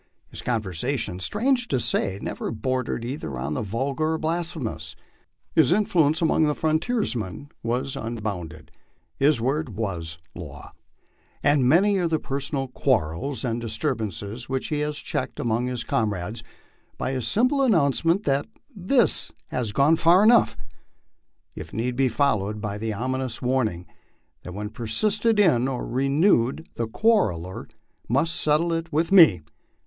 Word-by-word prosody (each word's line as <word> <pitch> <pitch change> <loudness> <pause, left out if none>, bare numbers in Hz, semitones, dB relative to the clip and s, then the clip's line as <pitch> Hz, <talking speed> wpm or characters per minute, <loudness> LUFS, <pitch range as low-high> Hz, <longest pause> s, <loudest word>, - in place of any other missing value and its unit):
His - - -7
conversation, 110 - -2
strange 245 - +1
to 130 - 0
say, 100 -4 +1
never - - -4
bordered 125 0 -2
either 100 - -5
on 70 +4 -3
the - - -2
vulgar 135 +9 -1
or - - -1
blasphemous. 160 - -3 0.6
His 160 0 +4
influence 170 -6 +2
among 160 -1 +3
the 150 - 0
frontiersmen 155 - -1
was 125 +4 -2
unbounded, 100 - -5 0.5
his 140 -1 +3
word 130 -1 -1
was 85 -7 -4 0.2
law; - - -9 0.7
and 140 -4 +3
many 195 +7 +4
are 180 -2 +1
the 160 -1 +1
personal 140 -1 -3
quarrels 125 - -1
and 120 -1 -2
disturbances 115 - -3
which 130 -1 -2
he 150 - -1
has 150 0 -2
checked 130 - -3
among 120 +1 0
his 125 -2 -2
comrades 105 0 -2 0.6
by 130 - -2
his 130 -3 -2
simple 255 +6 +2
an 255 -5 +4
nouncement 165 +4 +2
that 140 0 0 0.2
'* - - -31
this 210 +6 +2 0.2
has 120 -4 -2
gone 140 +9 +3
far 175 +5 +5
enough," 235 +2 +5 1.0
if - - -8
need 120 +3 -2
be 135 0 +2
followed 110 -6 0
by 105 -1 -4
the 110 0 -2
ominous 130 +2 -3
warning 120 -9 -1 0.6
that 90 - -9
when 105 +1 -4
persisted 210 - +1
in 130 -11 +4
or 130 -2 -3
renewed 135 - +2
the 115 - -3
quarreller 110 - 0 0.2
" - - -46
must 150 +8 +2
settle 155 +3 +2
it 165 0 -3
with 160 +3 0
me." 160 - +7
130 Hz, 145 wpm, -24 LUFS, 110-160 Hz, 1.0 s, me